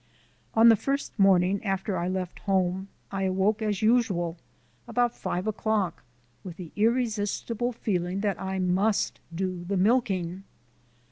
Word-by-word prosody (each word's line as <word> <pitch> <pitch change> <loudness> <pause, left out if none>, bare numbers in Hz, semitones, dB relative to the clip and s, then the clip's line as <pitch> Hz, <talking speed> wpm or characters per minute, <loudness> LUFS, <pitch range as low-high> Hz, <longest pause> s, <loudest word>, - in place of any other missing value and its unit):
On 225 +1 +8
the 225 - +8
first 275 +1 -3
morning 195 0 +4
after 195 0 -1
I 175 0 -1
left 185 -1 -3
home 190 -1 0 0.2
I 195 -1 -1
awoke 195 +4 +1
as 210 -2 -1
usual 200 -8 +2 0.5
about 240 +1 +1
five 180 +2 -3
o'clock 215 -4 -1 0.4
with 180 -3 -8
the 175 -4 -8
irresistible 230 +1 0
feeling 190 -5 -2
that 205 -2 -1
I 190 0 -2
must 190 +3 +1 0.2
do 185 -1 -2
the 195 +2 -2
milking. 195 -4 +1
195 Hz, 135 wpm, -27 LUFS, 185-220 Hz, 0.5 s, On